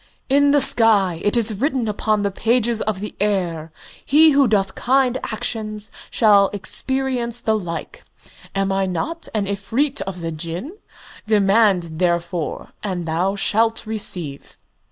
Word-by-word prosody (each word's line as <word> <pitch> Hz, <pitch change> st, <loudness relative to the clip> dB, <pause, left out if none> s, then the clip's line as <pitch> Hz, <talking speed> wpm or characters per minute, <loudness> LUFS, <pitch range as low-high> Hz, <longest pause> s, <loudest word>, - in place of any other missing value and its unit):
"In 285 Hz, +1 st, +4 dB
the 290 Hz, 0 st, +4 dB
sky 205 Hz, -9 st, +3 dB
it 205 Hz, +3 st, +2 dB
is 225 Hz, -1 st, +2 dB
written 260 Hz, +2 st, -1 dB
upon 210 Hz, 0 st, 0 dB
the 200 Hz, -, 0 dB
pages 235 Hz, +2 st, +1 dB
of 210 Hz, -3 st, -2 dB
the 210 Hz, -, -6 dB
air: 175 Hz, -6 st, -1 dB, 0.3 s
'He 310 Hz, +3 st, +5 dB
who 280 Hz, -2 st, +4 dB
doth 195 Hz, -3 st, +1 dB
kind 260 Hz, 0 st, +1 dB
actions 215 Hz, -2 st, -3 dB, 0.2 s
shall 205 Hz, -3 st, +4 dB
experience 240 Hz, +4 st, -2 dB
the 220 Hz, -2 st, 0 dB
like.' 170 Hz, -6 st, -6 dB, 0.5 s
Am 195 Hz, 0 st, 0 dB
I 195 Hz, 0 st, 0 dB
not 320 Hz, -, -4 dB
an 210 Hz, -2 st, 0 dB
Efreet 230 Hz, +9 st, -1 dB
of 180 Hz, -2 st, -5 dB
the 165 Hz, 0 st, -3 dB
Jinn? 170 Hz, -, -5 dB, 0.5 s
Demand, 195 Hz, -5 st, +2 dB
therefore, 170 Hz, -2 st, -2 dB
and 180 Hz, -5 st, -4 dB
thou 180 Hz, +5 st, 0 dB
shalt 225 Hz, +3 st, +1 dB
receive." 180 Hz, -9 st, -2 dB
210 Hz, 140 wpm, -20 LUFS, 185-235 Hz, 0.5 s, He